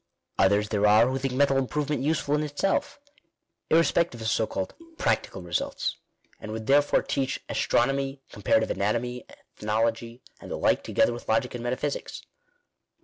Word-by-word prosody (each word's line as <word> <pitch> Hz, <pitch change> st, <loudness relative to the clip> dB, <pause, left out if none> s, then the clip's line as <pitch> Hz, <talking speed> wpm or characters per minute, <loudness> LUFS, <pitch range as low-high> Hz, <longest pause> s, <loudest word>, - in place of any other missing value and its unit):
Others 100 Hz, +2 st, +3 dB
there 105 Hz, -1 st, +2 dB
are 105 Hz, +2 st, +6 dB
who 130 Hz, +1 st, -1 dB
think 135 Hz, -1 st, -2 dB
mental 140 Hz, 0 st, +3 dB
improvement 150 Hz, +2 st, -1 dB
useful 145 Hz, 0 st, 0 dB
in 150 Hz, -, +2 dB
itself, 175 Hz, -, -1 dB, 0.7 s
irrespective 165 Hz, -4 st, +2 dB
of 110 Hz, -, -4 dB
so 110 Hz, -, +1 dB
called 95 Hz, -, -4 dB, 0.2 s
practical 95 Hz, -, -1 dB
results, 85 Hz, -1 st, -2 dB, 0.4 s
and 110 Hz, -, -7 dB
would 110 Hz, 0 st, -5 dB
therefore 145 Hz, +3 st, +3 dB
teach 135 Hz, -1 st, -1 dB
astronomy, 135 Hz, +2 st, 0 dB
com 105 Hz, -, -11 dB
parative 110 Hz, +2 st, +2 dB
anatomy, 120 Hz, +4 st, -2 dB
ethnology, 115 Hz, +3 st, -3 dB, 0.2 s
and -, -, -11 dB
the -, -, -3 dB
like, -, -, +2 dB
together 120 Hz, -, +2 dB
with 120 Hz, -, -9 dB
logic 115 Hz, +3 st, +1 dB
and 120 Hz, -1 st, -5 dB
metaphysics. 130 Hz, +4 st, -3 dB
125 Hz, 150 wpm, -26 LUFS, 110-140 Hz, 0.7 s, are